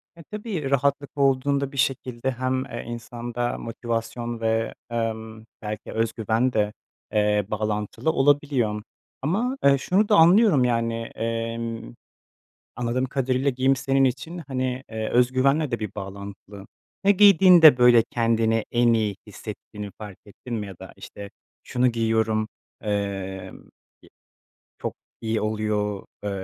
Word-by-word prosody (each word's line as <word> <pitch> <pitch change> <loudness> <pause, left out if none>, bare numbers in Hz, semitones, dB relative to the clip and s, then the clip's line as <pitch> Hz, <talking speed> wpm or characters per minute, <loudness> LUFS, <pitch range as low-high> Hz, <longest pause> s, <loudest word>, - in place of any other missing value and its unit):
E, 170 - -13
tabii, 205 - -4
rahatlık 140 +1 +1
olduğunda 140 0 +2
bir 140 - -10
şekilde 130 -1 -1
hem, 130 +1 -1
eee, 120 -3 -6
insanda 120 +1 -4
motivasyon 115 0 -4
ve, 115 0 0 0.2
emm, 110 -1 -4 0.2
belki 105 0 -6
özgüven 115 +2 0
de, 105 -1 +1 0.4
eee, 105 -1 +2
bağlantılı 105 +8 -1
olabiliyor. 135 -7 +2 0.4
Ama, 220 - 0
eee, 140 0 +6
şunu 195 +9 +1
da - - +5
anlıyorum. 175 - +6
Yani, 115 -1 +1 0.2
emm, 115 - -3 0.8
anladığım 125 +1 -1
kadarıyla 130 0 0
giyim 130 +1 +2
senin 135 +1 +1
için, 160 +7 -2
hani, 130 -1 -2
eee, 110 -1 -3
özgüvenle 130 +4 +2
de 120 - -1
bir 105 -3 -4
bağlantılı. 100 0 -8 0.4
Ya, 200 - +7
giydiğinde, 185 -7 +8
böyle, 120 -2 +6
kendini 115 -1 +1
en 120 -1 +4
iyi 110 -3 0
hissettiğini 105 -1 -8
fark 105 -3 -9
ettin 115 +4 -10
mi 105 -3 -3
ya 95 - -9
da, - - -11
işte, 100 -1 -10 0.3
şunu 125 0 +1
giyiyorum, 110 -2 +1 0.3
emm, - - -9 0.7
ye - - -17 1.2
çok - - -3 0.3
iyi 110 -1 -1
oluyor, 105 -2 -1 0.2
eee, 105 - -2
120 Hz, 130 wpm, -24 LUFS, 110-135 Hz, 1.2 s, giydiğinde